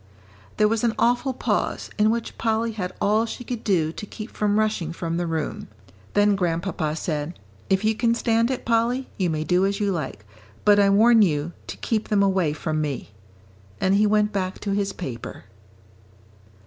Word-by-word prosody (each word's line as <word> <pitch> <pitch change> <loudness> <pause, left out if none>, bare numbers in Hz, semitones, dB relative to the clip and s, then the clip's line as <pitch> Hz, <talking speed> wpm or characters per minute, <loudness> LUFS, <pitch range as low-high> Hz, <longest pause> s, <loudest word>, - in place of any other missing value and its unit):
There 210 - +5
was 225 +1 0
an 235 -1 +1
awful 245 +3 +2
pause 255 - -2
in 215 +1 +5
which 230 0 -2
Polly 225 0 0
had 185 -4 -4
all 215 +3 +2
she 245 - -6
could 240 -1 -5
do 165 -6 +1
to 210 - -7
keep 215 +2 -8
from 210 0 0
rushing 215 -7 0
from 165 0 -3
the 175 0 -1
room. 160 -2 -3 0.5
Then 205 0 +4
Grandpapa 170 -3 -1
said, 155 0 -3 0.3
"If 190 +1 +2
you 220 +1 +3
can 230 +1 +1
stand 230 0 +2
it, 260 - -3
Polly, 235 +3 +1
you 180 -2 +1
may 155 -1 -1
do 180 +3 +2
as 200 +1 0
you 205 -1 +1
like, 135 - -4 0.4
but 205 0 +6
I 200 -1 +5
warn 225 +3 +6
you 155 -4 +1 0.2
to - - -6
keep 220 -2 -1
them 205 -1 +3
away 190 -5 +2
from 155 +1 -2
me." 140 -8 -4 0.7
And 190 - +2
he 210 +1 +4
went 210 0 +2
back 185 -1 -2
to 205 - -2
his 200 0 0
paper. 125 -10 -7
200 Hz, 185 wpm, -24 LUFS, 170-220 Hz, 0.7 s, but